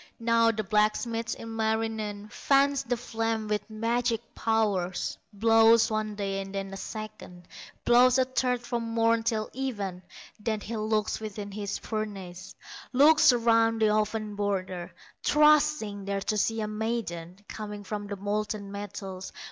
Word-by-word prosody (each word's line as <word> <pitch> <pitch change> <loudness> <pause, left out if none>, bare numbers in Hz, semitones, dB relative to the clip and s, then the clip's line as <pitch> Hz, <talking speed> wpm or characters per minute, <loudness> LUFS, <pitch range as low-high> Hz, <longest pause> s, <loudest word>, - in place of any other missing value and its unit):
Now 230 0 +3
the 220 -1 -1
blacksmith, 215 +3 0
Ilmarinen, 220 -2 -2
Fans 275 +2 +3
the 245 -2 -1
flames 225 -2 -2
with 210 +1 -1
magic 230 +1 0
powers, 205 -5 0 0.2
Blows 225 +2 +5
one 215 -1 -2
day, 195 -1 -2
and 195 0 -8
then 195 0 -4
a - - -4
second, 215 -5 -8 0.4
Blows 245 +2 +6
a 260 - +4
third 250 -1 0
from 240 -1 -3
morn 230 0 +2
till 220 -1 -1
even; 205 -9 -3 0.4
Then 215 0 -1
he 230 +3 -5
looks 215 0 0
within 210 -2 -6
his 200 0 -4
furnace, 195 -5 -6 0.4
Looks 295 +3 +6
around 230 -1 +3
the 220 -1 +4
oven 215 0 -1
border, 190 -3 -2 0.3
Trusting 300 -9 +3
there 200 0 -2
to 215 - -1
see 225 +2 0
a 215 - -2
maiden 210 -6 -3
Coming 210 -1 -7
from 205 0 -5
the 200 - -4
molten 205 0 -3
metals. 200 -2 -6
215 Hz, 140 wpm, -28 LUFS, 205-230 Hz, 0.4 s, Blows